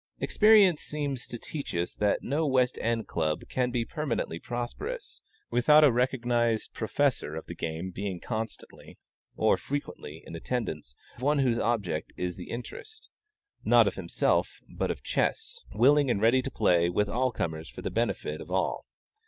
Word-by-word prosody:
Experience 210 Hz, -6 st, +5 dB
seems 145 Hz, -4 st, -4 dB
to 120 Hz, -, -6 dB
teach 140 Hz, -, -6 dB
us 85 Hz, +1 st, -1 dB
that 105 Hz, -1 st, 0 dB
no 150 Hz, +4 st, 0 dB
West 130 Hz, -2 st, +2 dB
End 115 Hz, -1 st, -1 dB
Club 80 Hz, -2 st, -1 dB
can 125 Hz, -1 st, 0 dB
be 120 Hz, -2 st, -1 dB
permanently 125 Hz, -, -3 dB
prosperous, 130 Hz, -, -5 dB, 0.3 s
without 150 Hz, +5 st, +6 dB
a 145 Hz, -, +7 dB
recognized 120 Hz, -2 st, +1 dB
professor 115 Hz, -, 0 dB
of 80 Hz, -, -6 dB
the -, -, -7 dB
game 85 Hz, +3 st, -4 dB
being 95 Hz, -1 st, -4 dB
constantly, 110 Hz, +2 st, -6 dB, 0.4 s
or -, -, +3 dB
frequently, 105 Hz, -, -6 dB
in -, -, -8 dB
attendance; 80 Hz, -, -4 dB, 0.2 s
one 145 Hz, +4 st, +2 dB
whose 125 Hz, -4 st, +2 dB
object 100 Hz, -10 st, -1 dB
is 90 Hz, -1 st, -2 dB
the -, -, -9 dB
interest, 420 Hz, -, -8 dB, 0.5 s
not -, -, +6 dB
of -, -, 0 dB
himself, -, -, 0 dB, 0.2 s
but -, -, -1 dB
of -, -, -4 dB
chess, 465 Hz, +1 st, -1 dB
willing 145 Hz, +2 st, +4 dB
and 110 Hz, -, +1 dB
ready 115 Hz, +4 st, +4 dB
to 135 Hz, -, -4 dB
play 85 Hz, -8 st, +3 dB
with 105 Hz, +4 st, +1 dB
all 125 Hz, +4 st, 0 dB
comers 80 Hz, -7 st, -4 dB
for -, -, -10 dB
the -, -, -3 dB
benefit 115 Hz, +1 st, -1 dB
of -, -, -10 dB
all. -, -, -1 dB
120 Hz, 160 wpm, -28 LUFS, 95-140 Hz, 0.5 s, a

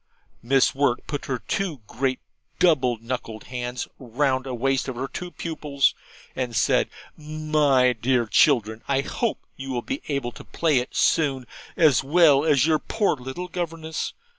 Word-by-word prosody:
Miss 135 Hz, +3 st, +3 dB
Wirt 135 Hz, -3 st, +1 dB
put 145 Hz, -, -4 dB
her 130 Hz, -, -1 dB
two 165 Hz, 0 st, -3 dB
great 130 Hz, +3 st, -1 dB, 0.4 s
double 135 Hz, -9 st, +3 dB
knuckled 115 Hz, -1 st, -5 dB
hands 125 Hz, 0 st, -4 dB
round 130 Hz, +1 st, 0 dB
a 130 Hz, -, -3 dB
waist 135 Hz, +2 st, 0 dB
of 130 Hz, -, -4 dB
her 130 Hz, +3 st, -3 dB
two 180 Hz, +5 st, -6 dB
pupils, 150 Hz, -5 st, 0 dB, 0.4 s
and 125 Hz, -3 st, -3 dB
said, -, -, +2 dB, 0.3 s
'My 150 Hz, -4 st, +2 dB
dear 120 Hz, +1 st, +1 dB
children, 110 Hz, -2 st, +3 dB
I 135 Hz, -1 st, +2 dB
hope 230 Hz, -, -3 dB
you 135 Hz, 0 st, -7 dB
will 125 Hz, -2 st, -2 dB
be 275 Hz, -, -4 dB
able 140 Hz, -4 st, -2 dB
to -, -, -12 dB
play 155 Hz, -6 st, +1 dB
it 125 Hz, -, -6 dB
soon 140 Hz, -6 st, +2 dB, 0.3 s
as 155 Hz, -8 st, +5 dB
well 145 Hz, -1 st, +5 dB
as 145 Hz, -4 st, +4 dB
your 160 Hz, -1 st, +3 dB
poor 210 Hz, +2 st, 0 dB
little 130 Hz, +7 st, -6 dB
governess. 165 Hz, -3 st, -4 dB
135 Hz, 160 wpm, -24 LUFS, 125-155 Hz, 0.4 s, as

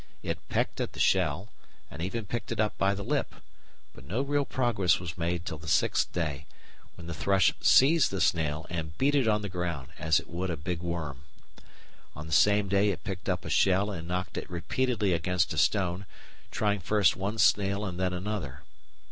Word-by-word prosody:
It -, -, -3 dB
pecked -, -, -1 dB
at -, -, -3 dB
the -, -, -10 dB
shell 90 Hz, +1 st, +2 dB, 0.4 s
and 75 Hz, -, -7 dB
even 105 Hz, +5 st, -3 dB
picked 120 Hz, +5 st, -4 dB
it -, -, -3 dB
up 110 Hz, -1 st, +1 dB
by 100 Hz, +1 st, +2 dB
the 100 Hz, -, -5 dB
lip, -, -, -1 dB, 0.6 s
but -, -, -14 dB
no 100 Hz, -, -2 dB
real 145 Hz, 0 st, 0 dB
progress 115 Hz, -10 st, +1 dB
was 85 Hz, -2 st, -6 dB
made 85 Hz, 0 st, -2 dB
till 80 Hz, -, -5 dB
the 80 Hz, -, -11 dB
sixth -, -, +2 dB
day, 75 Hz, -4 st, -3 dB, 0.5 s
when 85 Hz, -, -11 dB
the 85 Hz, -, -5 dB
thrush 95 Hz, +4 st, +3 dB
seized 150 Hz, +3 st, +5 dB
the 95 Hz, -, -3 dB
snail 80 Hz, -2 st, +1 dB
and 80 Hz, -2 st, -4 dB
beat 140 Hz, +2 st, +2 dB
it 135 Hz, -5 st, +2 dB
on 105 Hz, -1 st, +2 dB
the -, -, -2 dB
ground 90 Hz, -7 st, -4 dB
as 80 Hz, 0 st, +3 dB
it -, -, -12 dB
would 90 Hz, +3 st, -3 dB
a 85 Hz, -, -2 dB
big 85 Hz, +3 st, -3 dB
worm. 85 Hz, -6 st, -4 dB, 0.9 s
On 75 Hz, -, -7 dB
the 80 Hz, -, -5 dB
same 100 Hz, +6 st, +4 dB
day 100 Hz, +2 st, +3 dB
it 90 Hz, -4 st, -3 dB
picked 95 Hz, 0 st, -5 dB
up 90 Hz, -1 st, -1 dB
a -, -, -4 dB
shell 100 Hz, +2 st, +3 dB
and 85 Hz, -4 st, -6 dB
knocked 90 Hz, +1 st, -3 dB
it -, -, -10 dB
repeatedly 105 Hz, +3 st, 0 dB
against 85 Hz, -1 st, 0 dB
a -, -, -6 dB
stone, 90 Hz, +2 st, +1 dB, 0.4 s
trying 105 Hz, -1 st, 0 dB
first 100 Hz, +1 st, +2 dB
one 100 Hz, +4 st, -3 dB
snail 100 Hz, -1 st, +3 dB
and 90 Hz, -2 st, -5 dB
then 95 Hz, -1 st, +1 dB
another. 90 Hz, -7 st, -4 dB
90 Hz, 200 wpm, -28 LUFS, 85-105 Hz, 0.9 s, seized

